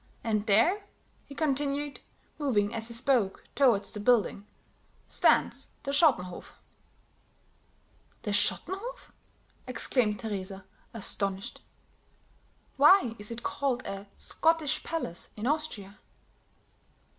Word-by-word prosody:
And 215 -2 0
there," 340 - +4 0.4
he 280 - -10
continued, 285 -1 -1 0.4
moving 210 -8 +1
as 225 0 -1
he 235 - -5
spoke 235 -5 +1
toward 240 -8 +4
the 210 - -5
building, 210 -2 +2 0.6
"stands - - +2 0.2
the 275 - -2
Schottenhof." 260 - +2 1.7
"The 210 - -2
Schottenhof?" 380 - -1 0.6
exclaimed 245 -4 +1
Teresa, 195 -3 -5 0.3
astonished. 200 -1 -3 1.2
"Why 290 - +6
is 205 - -4
it 235 0 -5
called 260 -3 -1
a 195 +1 -6
Scottish 320 -2 +1
palace 315 - -4
in 215 - -5
Austria?" 250 -9 -1
235 Hz, 100 wpm, -29 LUFS, 205-290 Hz, 1.7 s, Why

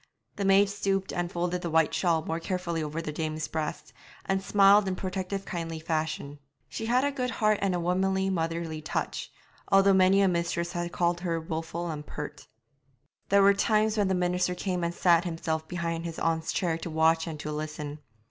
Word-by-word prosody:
The 200 - -2
maid 195 +1 +5
stooped 195 -1 -1
and 175 -1 -2
folded 175 +1 -1
the 170 - -3
white 160 -1 +3
shawl 165 -3 +1
more 165 +1 -2
carefully 170 -2 -2
over 155 +2 -4
the 155 - -3
dame's 155 0 -3
breast, 155 -1 -4 0.3
and 195 0 0
smiled 200 +1 +5
in 185 - -1
protective 190 +1 -4
kindly 165 -2 -4
fashion. 155 -3 -3 0.3
She 225 +11 -5
had 250 +3 +3
a 285 - +1
good 255 -2 -2
heart 215 -4 +1
and 195 -2 +1
a - - -1
womanly, 190 +2 +1
motherly 165 -2 -2
touch, 155 - -3 0.4
although 195 0 +6
many 190 +1 +5
a 195 - +4
mistress 170 -1 -1
had 175 0 -3
called 175 0 +1
her 170 -2 -1
wilful 165 +1 -4
and 150 -1 -5
pert. 150 -1 -8 0.8
There 200 0 +5
were 200 +1 +7
times 215 +1 +2
when 205 -3 +2
the 190 - +1
minister 180 0 0
came 180 -1 -2
and 170 - 0
sat 170 -1 +4
himself 160 -2 -3
behind 170 -1 -3
his 165 -1 -5
aunt's 160 -1 0
chair 170 -3 -1
to 170 - -5
watch 160 +1 +2
and 155 -2 -5
to 150 - -4
listen. 150 -1 -5
175 Hz, 195 wpm, -28 LUFS, 160-190 Hz, 0.8 s, were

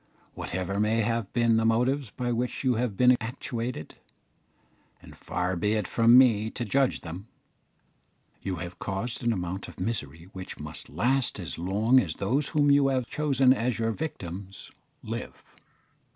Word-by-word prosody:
Whatever 95 +2 -3
may 110 +2 +2
have 115 -2 -1
been 115 -2 +3
the 110 - +2
motives 125 +3 +1
by 125 +3 -3
which 120 +3 -2
you 130 -2 +3
have 115 -4 -2
been 125 0 +6
actuated 115 - -5 1.0
and - - -14
far 90 +1 -2
be 105 +5 +1
it 105 -1 -1
from 115 +1 +5
me 110 -4 +5
to 120 - -4
judge 135 +4 +1
them 90 +5 -8 1.1
you 95 -2 -3
have 90 0 -7
caused 110 +6 -3
an 120 - +2
amount 95 -2 -3
of - - -12
misery 85 -7 -3
which 95 -1 -8
must - - -6
last 130 -2 0
as 85 -3 -5
long 105 +8 +3
as - - -2
those 140 +4 0
whom 145 -2 +3
you 140 -1 +5
have 130 -2 +1
chosen 135 -2 +3
as 125 -1 -1
your 115 0 0
victims 95 - -6 0.3
live." - - -7
115 Hz, 160 wpm, -27 LUFS, 95-125 Hz, 1.1 s, been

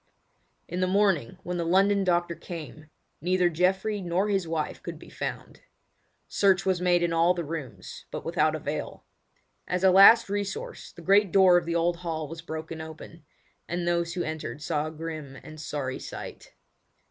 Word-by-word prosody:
In 175 - -4
the 185 - +2
morning 190 - +1
when 180 0 -3
the 170 - -1
London 195 +4 +3
doctor 175 -2 +1
came, 155 -3 -9 0.3
neither 180 +1 +2
Geoffrey 190 +5 0
nor 180 +3 0
his 195 -4 0
wife 160 -2 -3
could - - -7
be - - -14
found. - - -6 0.7
Search 195 -1 +2
was 185 -2 +1
made 175 -1 +3
in 170 -1 0
all 170 +2 +3
the 170 - -3
rooms, 150 -5 -7
but - - -6
without - - +1
avail. - - -5 0.6
As 180 +1 -1
a 190 - +6
last 200 +5 +8
resource 200 -1 -4
the 170 - -13
great 195 +1 +4
door 190 -1 +6
of 175 -1 +2
the 170 - -1
old 170 +1 +1
hall 165 -3 -4
was 165 +2 -8
broken 160 0 -6
open, 160 0 -11 0.4
and 175 0 -3
those 170 -1 0
who 175 - -1
entered 155 -3 -5
saw 150 0 -1
a - - -6
grim 155 -3 -7
and 155 0 -10
sorry 140 -4 -4
sight. - - -9
175 Hz, 175 wpm, -27 LUFS, 160-185 Hz, 0.7 s, last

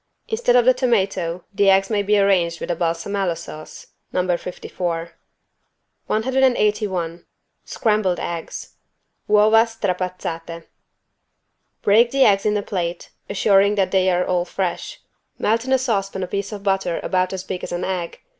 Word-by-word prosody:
Instead 445 - +1
of 245 -1 +5
the 255 - +6
tomato, 195 -9 0
the 200 0 +3
eggs 195 +2 +3
may 210 -1 +2
be 205 +1 +2
arranged 180 -4 +2
with - - -3
a - - 0
=balsamella= 170 +2 -1
sauce 155 -2 -10 0.3
(No. 180 -1 +1
54). 170 -1 -5 1.0
181 210 -8 0 0.4
SCRAMBLED 210 -5 0
EGGS 170 -1 -6 0.5
(Uova 215 +2 +5
strapazzate) 180 -5 -4 1.2
Break 225 +4 +5
the 270 +1 +3
eggs 195 0 +3
in 210 0 +2
a 205 - -2
plate, 175 -3 -4 0.2
assuring 200 0 +3
first - - -3
that 195 -2 +1
they 190 -1 +3
are 180 0 +1
all 180 -1 +1
fresh. 180 0 -4 0.4
Melt 225 +3 0
in 260 - -3
a 265 - +5
saucepan 195 -7 -1
a - - -3
piece 200 +2 -3
of 205 -2 -7
butter 195 -3 0
about 185 -1 0
as 190 -1 -4
big 185 -1 -5
as - - -5
an 175 +1 -3
egg. 180 -3 -4
195 Hz, 155 wpm, -21 LUFS, 175-210 Hz, 1.2 s, the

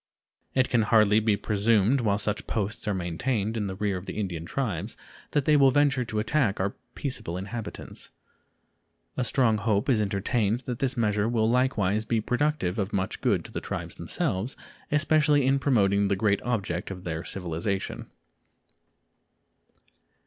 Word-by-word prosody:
It 130 -1 +3
can 120 - +2
hardly 105 -1 +4
be 110 -2 +2
presumed 110 +5 +2
while 100 -3 +2
such 105 0 -2
posts 105 0 -3
are 105 - +1
maintained 100 +5 -1
in 105 -3 -1
the 95 - -4
rear 100 -1 -1
of 90 - -9
the - - -5
Indian 90 -6 -3
tribes 105 -5 -3 0.3
that 145 -3 0
they 155 - +5
will 140 -2 +6
venture 140 -2 +3
to 110 -2 -5
attack 110 -1 +1
our 100 +2 0 0.2
peaceable 125 - -3
inhabitants. 105 +4 -7 1.1
A 130 - 0
strong 115 -3 +2
hope 105 +2 0
is 115 -5 +3
entertained 105 +3 0
that 125 -3 -5
this 135 -2 -1
measure 105 -1 +1
will 110 -2 +2
likewise 110 -5 +1
be 115 +1 0
productive 125 -5 0
of 100 +1 -1
much 95 -1 -2
good - - +1
to - - -10
the - - -4
tribes - - -5
themselves, 100 +8 -2 0.3
especially 150 -2 +3
in 135 +1 +3
promoting 100 -7 +3
the 100 - +1
great 100 0 +1
object 100 -7 -2
of 90 -2 -7
their 80 -1 -4
civilization. 90 +2 -3
110 Hz, 160 wpm, -27 LUFS, 100-125 Hz, 1.1 s, will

